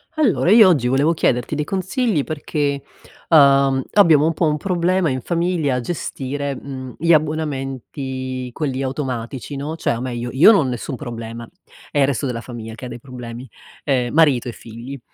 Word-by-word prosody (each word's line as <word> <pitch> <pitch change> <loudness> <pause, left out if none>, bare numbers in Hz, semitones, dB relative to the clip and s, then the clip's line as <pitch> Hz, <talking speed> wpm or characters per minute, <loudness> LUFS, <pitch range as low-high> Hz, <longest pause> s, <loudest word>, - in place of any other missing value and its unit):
Allora. 235 - +2
io 220 -2 +8
oggi 145 -10 +3
volevo 140 +6 +3
chiederti 125 -2 0
dei 150 - -1
consigli 190 - -1
perché, 145 -2 -2 0.5
uhm, 140 -3 +5
abbiamo 160 -7 +6
un 165 - +1
po' 165 - 0
un 150 0 +1
problema 180 0 +1
in 130 -1 -2
famiglia 170 -4 0
a - - 0
gestire, 140 -1 -4
mhmm, 130 -1 -8
gli 170 +1 +3
abbonamenti, 135 -4 -2
quelli 135 0 -3
automatici, 130 -1 -4
no? 150 +4 -4
Cioè 140 - 0
o 115 - -5
meglio, 120 -1 -4
io 150 +11 +7
non 195 -10 +4
ho - - -2
nessun 125 +2 -4
problema. 115 -3 -7 0.4
È 145 - -1
il 140 - +5
resto 140 +1 -1
della 120 -3 -3
famiglia 115 -2 -8
che 120 - -9
ha - - -5
dei - - -8
problemi, 125 -1 -9 0.4
ehm, 125 -4 0
marito 145 -6 +3
e - - -4
figli. 120 +5 -9
140 Hz, 180 wpm, -20 LUFS, 125-155 Hz, 0.5 s, io